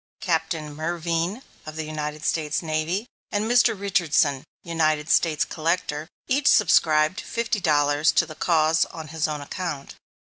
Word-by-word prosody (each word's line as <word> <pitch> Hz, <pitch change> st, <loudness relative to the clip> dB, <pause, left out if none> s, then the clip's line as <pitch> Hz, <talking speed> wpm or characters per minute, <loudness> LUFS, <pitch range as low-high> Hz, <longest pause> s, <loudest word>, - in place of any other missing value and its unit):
Captain 160 Hz, -5 st, -1 dB
Mervine 170 Hz, -, -2 dB, 0.2 s
of 155 Hz, -, -7 dB
the 160 Hz, -, -3 dB
United 150 Hz, 0 st, -5 dB
States 155 Hz, 0 st, -1 dB
Navy, 160 Hz, +6 st, -1 dB, 0.3 s
and 205 Hz, +1 st, 0 dB
Mr. 230 Hz, -3 st, +3 dB
Richardson, 155 Hz, -8 st, +1 dB, 0.2 s
United 155 Hz, -2 st, 0 dB
States 160 Hz, -4 st, +2 dB
Collector, 160 Hz, -2 st, -2 dB, 0.2 s
each 275 Hz, +2 st, +1 dB
subscribed 160 Hz, -4 st, +4 dB
fifty 230 Hz, -2 st, -2 dB
dollars 145 Hz, -2 st, +3 dB
to -, -, +3 dB
the 155 Hz, -, -9 dB
cause 160 Hz, 0 st, +2 dB
on 160 Hz, -2 st, -9 dB
his 160 Hz, 0 st, -1 dB
own 150 Hz, -1 st, -4 dB
account. 150 Hz, -2 st, -5 dB
160 Hz, 140 wpm, -24 LUFS, 155-175 Hz, 0.3 s, subscribed